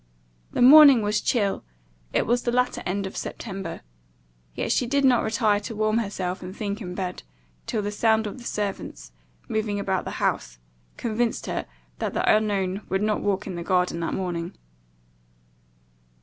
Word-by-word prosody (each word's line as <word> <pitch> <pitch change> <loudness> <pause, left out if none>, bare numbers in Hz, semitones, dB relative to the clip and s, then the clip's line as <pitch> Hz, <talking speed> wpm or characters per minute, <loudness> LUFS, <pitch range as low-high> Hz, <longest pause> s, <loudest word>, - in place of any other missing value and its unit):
The - - +2
morning 275 -3 +9
was 210 +1 +1
chill, 205 -5 0 0.5
it - - +1
was 240 +2 +2
the 240 - -1
latter 250 +1 +1
end 200 +2 -1
of 190 - -7
September; 195 -3 -6 0.7
yet - - -2
she 245 - +1
did 280 +2 +2
not 250 -2 +5
retire 220 -2 +2
to 220 +2 -7
warm 215 +1 +1
herself 190 -4 -3
and 185 +2 -8
think 205 +1 -3
in 180 -3 -6
bed, 185 -2 -4 0.5
till 215 - -1
the 205 - -2
sound 220 +1 +2
of 210 +5 -6
the - - -11
servants, 205 - -4 0.4
moving 210 -2 -1
about 190 -2 -1
the - - -5
house, - - -1 0.4
convinced 235 0 -1
her - - -3 0.3
that - - -3
the - - +4
unknown 200 -2 0
would 190 +2 0
not 215 0 0
walk 200 0 -1
in 195 - -5
the 170 - -5
garden 180 -2 +1
that 165 - -2
morning. 175 -2 -3
205 Hz, 170 wpm, -25 LUFS, 190-225 Hz, 0.7 s, morning